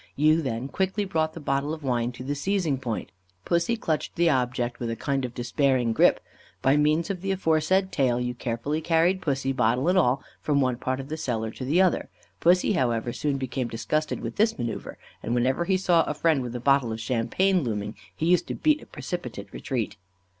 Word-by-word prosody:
You 155 +3 +4
then 130 -3 -3
quickly 190 +6 -1
brought 160 -4 0
the - - -6
bottle 140 +1 -1
of 155 - -14
wine 120 -2 0
to 125 - -8
the 140 +3 -2
seizing 160 -2 0
point; 120 -4 -4 0.3
Pussy 170 +7 +1
clutched 160 -8 -2
the 170 -1 +3
object 125 -2 -1
with 120 - -3
a 115 - -2
kind 135 +2 -1
of 125 -1 -5
despairing 125 -1 +1
grip. - - +4 0.4
By 135 +2 +4
means 150 +4 +2
of 185 -3 -5
the 195 - -3
aforesaid 185 +1 +2
tail, 125 -4 +1
you 125 0 -2
carefully 125 +6 -2
carried 170 +3 +2
pussy, 135 -4 0
bottle 130 +2 +1
and 185 +1 +4
all, 135 -4 +2 0.2
from 145 -2 +1
one 130 -3 +1
part 130 +2 -2
of 135 +1 -7
the 155 - -3
cellar 115 -7 -2
to 130 - -8
the 160 +9 +3
other. 185 - +1 0.3
Pussy, 180 +4 +4
however, 120 - 0
soon 140 +1 -1
became 130 -1 -2
disgusted 155 +7 -2
with - - -5
this 220 +2 +3
manœuvre, 120 -2 -4 0.3
and 120 - -2
whenever 130 +7 +1
he 190 +1 +2
saw 175 -3 +3
a 150 - -3
friend 155 -2 +2
with 125 -1 -5
a - - -2
bottle 135 -2 +3
of 110 - -4
champagne 130 +11 +1
looming, 105 -3 -3 0.2
he 160 - -2
used 175 +1 +3
to - - -3
beat 305 -1 +2
a - - -14
precipitate 175 -2 -6
retreat. 125 -6 -3
140 Hz, 210 wpm, -26 LUFS, 125-165 Hz, 0.4 s, You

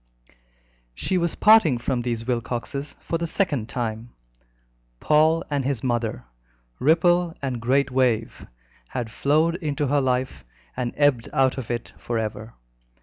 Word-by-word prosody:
She 185 - -1
was 170 -1 0
parting 210 - +5
from 120 +1 -1
these 115 -1 -3
Wilcoxes 125 +4 -3
for 165 - -3
the 170 - -2
second 145 - -1
time. 115 -1 -4 0.9
Paul 160 +2 +3
and 145 -2 -1
his 130 -3 -2
mother, 120 - -2 0.5
ripple 175 +3 +3
and 130 -4 -3
great 135 +3 +2
wave, 125 -4 0 0.4
had 120 - -4
flowed 155 +7 +2
into 150 -4 -2
her 145 +1 +2
life 130 0 -1 0.3
and 125 -2 -2
ebbed 145 -6 +2
out 135 -2 +2
of 120 - -7
it 120 -1 -4
for 120 - -3
ever. 110 0 -4
130 Hz, 140 wpm, -24 LUFS, 120-155 Hz, 0.9 s, parting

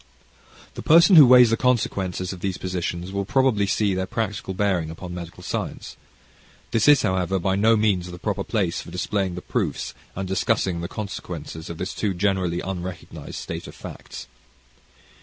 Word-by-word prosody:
The - - -7
person 170 +4 +6
who 150 -5 +10
weighs 125 -2 +7
the 115 - +2
consequences 95 -7 0
of 90 - -9
these 95 0 -2
positions 90 0 -4
will 100 0 -1
probably 110 -2 +2
see 100 0 +1
their 95 0 -2
practical 105 -3 -3
bearing 95 -5 0
upon 90 +2 -8
medical 85 -1 -8
science. - - -4 0.8
This 115 +2 +2
is, 145 -1 +6
however, 95 0 0
by 95 +1 0
no 110 +3 +4
means 100 -5 +1
the 90 - -8
proper - - -2
place - - -1
for - - -11
displaying 95 -4 -2
the 90 - -7
proofs - - -2 0.2
and 95 0 -3
discussing 95 -2 0
the 85 - -3
consequences 85 -6 -6
of 85 - -6
this 90 +3 -4
too 100 -3 -1
generally 90 -2 0
unrecognized 90 -1 -6
state - - -6
of - - -11
facts. - - -9
95 Hz, 170 wpm, -23 LUFS, 90-105 Hz, 0.8 s, who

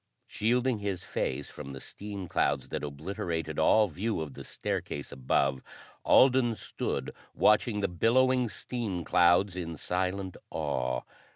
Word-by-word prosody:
Shielding 120 +2 +1
his 100 -3 -3
face 70 +2 -3
from 70 -2 -8
the 65 - -7
steam 100 +4 -7
clouds 65 -5 0
that - - -3
obliterated 80 +1 -3
all 105 +7 +5
view 100 +6 -2
of 75 -3 -5
the - - -9
staircase 70 - -4
above, 65 +1 +1 0.4
Alden 125 -3 +5
stood - - -4 0.2
watching 105 0 +3
the - - +2
billowing 125 +7 +3
steam 105 -3 -4
clouds 90 +3 +4
in 85 -3 -4
silent 95 +1 -2
awe. 60 -1 -1
95 Hz, 130 wpm, -29 LUFS, 75-110 Hz, 0.4 s, all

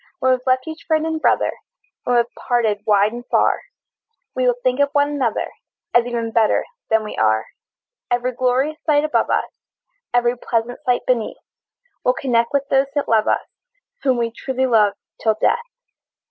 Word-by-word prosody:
When 260 -6 +2
we've 255 0 -1
left 255 +1 +2
each 320 +1 -8
friend 315 -1 +2
and 320 -1 -2
brother, - - +2 0.5
When 245 - +2
we're 235 -1 +4
parted 225 -5 0
wide 205 +1 +4
and 240 0 -7
far, - - +2 0.7
We 255 0 0
will 245 - +3
think 255 +1 +1
of 285 0 +3
one 285 0 +2
another, 260 -6 -1 0.4
As 240 0 +4
even 230 -2 -2
better 225 -2 +2 0.2
than 220 0 +3
we 210 - -6
are. 110 0 +2 0.6
Every 245 +1 0
glorious 255 +5 0
sight 295 -2 +3
above 305 - +1
us, - - 0 0.6
Every 240 0 +2
pleasant 235 0 -2
sight 245 -1 +1
beneath, 240 -4 0 0.7
We'll 250 - +2
connect 235 -3 +1
with 280 -1 0
those 270 0 +3
that 290 - 0
love 220 -1 +3
us, - - +1 0.6
Whom 260 -3 +2
we 230 -1 -1
truly 260 +2 -2
love 215 -5 +4 0.3
till 220 -1 +2
death! 470 - +2
245 Hz, 175 wpm, -20 LUFS, 230-270 Hz, 0.7 s, we're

